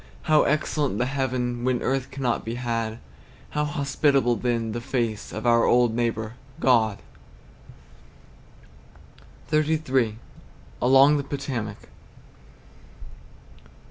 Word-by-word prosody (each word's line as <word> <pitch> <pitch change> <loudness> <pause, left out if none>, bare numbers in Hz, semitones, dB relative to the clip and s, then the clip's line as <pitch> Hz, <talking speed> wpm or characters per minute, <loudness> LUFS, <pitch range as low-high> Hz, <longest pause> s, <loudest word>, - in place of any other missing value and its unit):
How 155 -2 +4
excellent 150 -5 0
the 125 - +1
heaven, 125 -3 -2
When 125 -1 0
earth 135 -1 -1
cannot 130 -3 -2
be 115 +1 -4
had; 115 -2 -2 0.5
How 150 - 0
hospitable, 140 -3 +1
then, 115 0 -1
the 120 +2 -4
face 115 -4 -2
Of 110 +3 -6
our 115 -1 +4
old 120 -2 +3
neighbor, 115 -2 -1 0.3
God! 110 -5 +3 2.6
XXXIII. 150 -7 +1 0.6
ALONG 135 +4 +6
THE 140 - -2
POTOMAC. 125 -7 -5
125 Hz, 100 wpm, -25 LUFS, 115-140 Hz, 2.6 s, ALONG